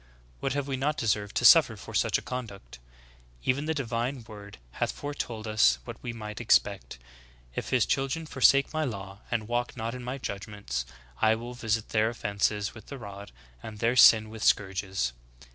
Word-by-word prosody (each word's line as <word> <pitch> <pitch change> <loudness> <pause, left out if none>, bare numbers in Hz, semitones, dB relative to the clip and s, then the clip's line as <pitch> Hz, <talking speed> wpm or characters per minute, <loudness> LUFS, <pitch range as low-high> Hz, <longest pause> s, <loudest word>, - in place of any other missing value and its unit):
What 135 - -1
have 140 -1 -2
we 135 -1 -2
not 145 +3 0
deserved 105 -2 -1
to - - +1
suffer - - +8
for - - -11
such - - +2
a - - -8
conduct? 100 - -7 0.6
Even 140 +3 0
the 160 - 0
divine 120 -1 -2
word 100 -2 -11 0.2
hath - - +2
foretold 120 -6 -5
us 105 - +4
what - - -9
we 120 - -4
might 105 -2 -7
expect. - - +2 0.3
— - - -28
*if - - -3
his 125 -3 +3
children 135 +4 -1
forsake 140 0 +4
my 155 0 0
law, 100 -6 -5
and 110 -3 -2
walk 120 +1 -2
not 115 +1 -3
in 125 -1 -7
my 125 +2 -4
judg 100 -6 -5
ments, 60 - -4 0.3
I 110 - +5
will 120 +2 -7
visit 115 -3 -2
their 110 0 +2
offenses 105 -2 -1
with 110 - -13
the 140 - -7
rod, 100 -3 -9 0.3
and 105 - -8
their 115 +3 +1
sin 110 -3 +7
with 110 -1 -7
scourges.' 95 -10 +1
110 Hz, 190 wpm, -28 LUFS, 100-125 Hz, 0.6 s, suffer